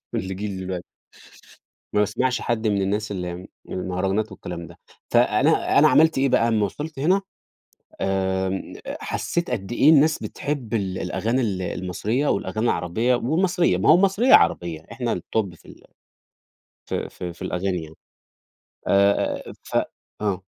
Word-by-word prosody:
من - - 0
جيْل 95 +2 -4
دلوقتي. 90 -2 -4 1.1
ما 105 - +2
باسمعش 120 +5 +1
حد 115 -2 -1
من 100 -2 +1
الناس 105 +2 -1
اللي 90 -3 -4
من 90 +2 -9 0.2
المهرجانات 95 +3 -2
والكلام 85 -2 -7
ده، 85 +2 -15 0.3
فأنا - - +3
أنا - - +7
عملت 160 -2 +4
إيه 135 0 +3
بقى، 115 -1 +3
امّا 110 -2 +2
وصلت 150 +9 -5
هنا 185 +8 +2 0.8
آمم، 95 0 -1
أ - - -4
حسيت 170 -3 -2
قدّ 115 -2 -3
إيه 140 +5 +5
الناس 155 0 +5
بتحب 135 -6 -4
ال 95 -4 -1
الأغاني 120 +4 -1
ال 100 -6 -1
المصرية 100 +10 -2
والأغاني 110 +2 -1
العربية 110 +6 +1
والمصرية، 170 +8 +1
ما - - +1
هو 155 - +9
المصرية 195 +7 +4
عربية 85 -3 +3
إحنا - - -1
الtop 100 -6 -2
في - - -20
ال - - -14 1.0
في - - -3
في 90 -1 -7
في - - -21
الأغاني 90 -1 -2
يعني. 80 0 -12 0.9
آآ، 100 +1 +3
أ - - -8
أ - - -8
ف - - -5 0.5
آه. 95 -3 -1
105 Hz, 155 wpm, -23 LUFS, 95-130 Hz, 1.1 s, هو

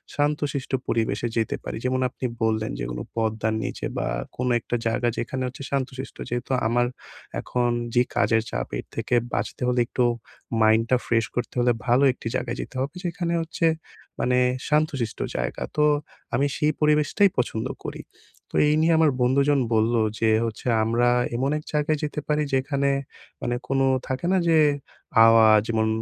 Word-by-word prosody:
শান্তশিষ্ট 145 -2 -1 0.2
পরিবেশে 110 0 0
যেতে 110 - 0
পারি। - - -5
যেমন 130 0 +1
আপনি 130 - -6 0.2
বললেন, 110 -1 0
"যেগুলো - - -4
পদ্মার 110 -1 0
নিচে - - -4
বা 60 - -1 0.3
কোনো 125 0 0
একটা 120 - -3
জায়গা 120 +1 0
যেখানে 130 +2 -3
হচ্ছে 130 +2 -8
শান্তশিষ্ট।" 135 -1 -3
যেহেতু 120 +2 -3 0.2
আমার 120 +1 +2 0.5
এখন 120 -1 0 0.2
যেই 120 0 +3
কাজের 115 -1 +3
চাপ - - -2
এর - - -6
থেকে 125 - 0 0.2
বাঁচতে - - -3
হলে 125 0 +1
একটু 125 - 0 0.6
মাইন্ডটা 115 +3 +4
ফ্রেশ 115 -1 +2
করতে 120 - -2
হলে 120 0 +4 0.2
ভালো 125 +3 +4
১ - - -12
টি - - -4
জায়গায় - - -2
যেতে - - -9
হবে। 140 +5 -3
যেখানে 170 -1 -2
হচ্ছে 165 +1 -2 0.5
মানে 125 0 +2 0.3
শান্তশিষ্ট 150 -7 0 0.2
জায়গা। - - -2
তো 150 - +4 0.5
আমি 140 +3 +2
সেই 150 0 +2
পরিবেশটাই 150 +7 +4
পছন্দ 110 -2 -1 0.2
করি। - - -5 0.5
তো - - -8
এই 150 - +3
নিয়ে 165 +1 +4
আমার 155 -3 +5
বন্ধুজন 140 +3 +3
বললো 110 +1 +3 0.2
যে 110 - +3 0.2
হচ্ছে, 115 +2 -5 0.2
"আমরা 120 +2 +2 0.3
এমন 135 +3 0
১ 150 - -7
জায়গায় 150 +1 +1
যেতে 150 0 -2
পারি।" 150 0 +1
যেখানে 140 +1 +1 0.5
মানে 120 - -1
কোন 135 0 +1 0.3
থাকে 130 +5 -3
না - - +4
যে? 160 - +5 0.7
"আওয়াজ 110 -1 +7
যেমন 110 -1 +1
125 Hz, 165 wpm, -24 LUFS, 115-145 Hz, 0.7 s, আওয়াজ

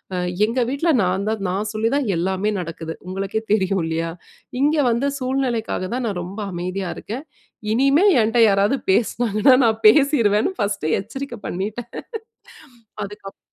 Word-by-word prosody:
அ - - -1 0.3
எங்க 230 +4 -2
வீட்ல 280 +6 0
நான் 185 +2 0
தான் 220 -2 -1
நான் 205 +4 -2
சொல்லி 220 +1 0
தான் 285 -4 0
எல்லாமே 190 +4 0
நடக்குது. 165 -2 -5
உங்களுக்கே 195 +3 -3
தெரியும் 190 -3 +1
இல்லயா! 165 +1 -2 0.5
இங்க 295 +2 +3 0.2
வந்து 240 +5 0
சூழ்நிலைக்காக 255 -7 -1
தான் 250 -1 -2
நான் 200 -4 -3
ரொம்ப 195 +4 -7
அமைதியா 180 +2 -3
இருக்கேன். 245 +8 -6 0.5
இனிமே 275 - +4 0.2
என்ட்ட 225 +2 +1
யாராவது 200 +6 +2
பேசுனாங்கன்னா, 235 +3 +3
நான் 225 0 +1
பேசிருவேன்னு 230 - +4
ஃபர்ஸ்ட்டே 200 -6 -1
எச்சரிக்க 240 +4 -7
பண்ணிட்டேன் 215 +6 -4 1.1
அதுக்கு 200 0 -9
அப் - - -51
215 Hz, 140 wpm, -21 LUFS, 190-245 Hz, 1.1 s, இனிமே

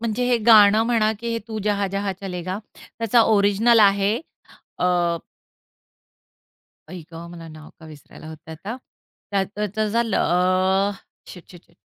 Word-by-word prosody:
म्हणजे 230 +1 -2
हे 245 - +2
गाणं 215 -1 +7
म्हणा, 220 -2 +1
की 235 - -5
हे 230 - -1
तू 220 - -5
जहाँ 205 -1 0
जहाँ 195 0 -3
चलेगा 185 0 -5 0.4
त्याचा 230 +1 +3
ओरिजिनल 215 +2 +3
आहे 200 +3 +3 0.6
अ 175 -1 +1 1.7
आई 180 +2 -8
गं! 165 - -8
मला 170 -1 -10
नाव 155 0 -13
का 160 - -12
विसरायला 155 0 -14
होतंय 160 0 -11
आता. 205 +9 -7 0.5
त्या 200 -1 +1
त्याचं 210 +2 -3
ज 230 - -2
ल - - -1
अ, 185 +3 +1 0.4
शिट, 180 - -12
शिट, 175 -2 -15
शिट! 170 - -30
200 Hz, 150 wpm, -22 LUFS, 180-215 Hz, 1.7 s, गाणं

